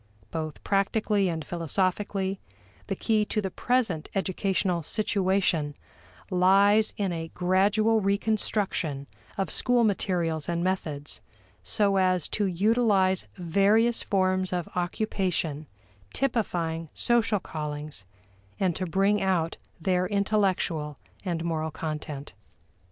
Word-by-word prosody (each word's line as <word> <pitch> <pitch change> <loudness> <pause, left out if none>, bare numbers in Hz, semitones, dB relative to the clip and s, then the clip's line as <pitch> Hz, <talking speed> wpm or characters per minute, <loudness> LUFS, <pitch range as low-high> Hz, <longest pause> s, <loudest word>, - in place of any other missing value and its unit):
Both 155 -2 -5
practically 200 0 +1
and 160 -2 -3
philosophically, 190 +3 -1 0.5
the - - -2
key 215 -2 +1
to 215 - -1
the 190 -3 -2
present 225 -11 0
educational 190 -2 0
situation 185 -5 0 0.6
lies 200 +4 +4
in 195 -3 0
a 165 -1 -4
gradual 205 +5 +3
reconstruction 200 -7 0 0.3
of 195 - -1
school 245 -1 +3
materials 175 -7 0
and 170 0 0
methods 155 -6 -3 0.4
so 195 - +2
as 185 -3 +2
to 205 -2 0
utilize 195 -1 +2
various 200 +6 +2
forms 185 -1 +1
of 175 -2 -2
occupation 175 -5 -1 0.5
typifying 170 - -1
social 230 -3 +3
callings, 150 - -5 0.6
and 185 -4 +1
to 185 - -2
bring 195 +4 +2
out 175 -4 0 0.2
their 180 +2 +1
intellectual 190 -7 0 0.3
and 170 -3 -2
moral 160 -1 -1
content. 150 -2 -5
185 Hz, 105 wpm, -27 LUFS, 165-205 Hz, 0.6 s, lies